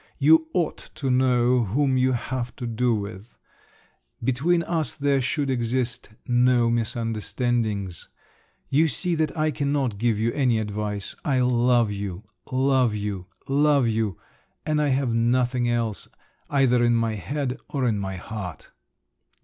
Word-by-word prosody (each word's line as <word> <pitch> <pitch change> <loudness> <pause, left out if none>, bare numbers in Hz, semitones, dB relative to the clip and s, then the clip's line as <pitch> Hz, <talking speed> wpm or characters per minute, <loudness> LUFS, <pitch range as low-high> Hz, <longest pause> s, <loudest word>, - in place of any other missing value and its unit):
You 160 +3 +5
ought 170 -3 -2
to 135 -3 -1
know 125 -1 +3
whom 130 +6 +1
you 130 0 +2
have 125 0 -3
to 125 - -6
do 120 +1 +1
with—between 120 - -4
us 165 -2 -1
there 140 -2 +1
should 140 +1 -1
exist 120 -1 -2 0.2
no 120 -1 +3
misunderstandings. 115 - -2 0.6
You 155 +4 +4
see 175 +5 -1
that 160 -1 -1
I 155 0 +1
cannot 140 -6 -1
give 115 -2 +1
you 115 +2 0
any 125 -5 +2
advice…. 105 -1 -3
I 135 -3 +1
love 120 -2 +3
you, 100 -1 -5 0.3
love 130 -3 +2
you, 100 -3 -4 0.2
love 140 -2 +3
you—and 115 - -3
I 150 - +2
have 135 -3 +1
nothing 120 +1 +1
else—either 120 +3 -1
in 120 0 +3
my 115 -1 +1
head 135 +5 -3
or 135 -3 -1
in 110 -3 0
my 95 -1 -4
heart!! 95 -4 -7
120 Hz, 135 wpm, -24 LUFS, 110-135 Hz, 0.6 s, You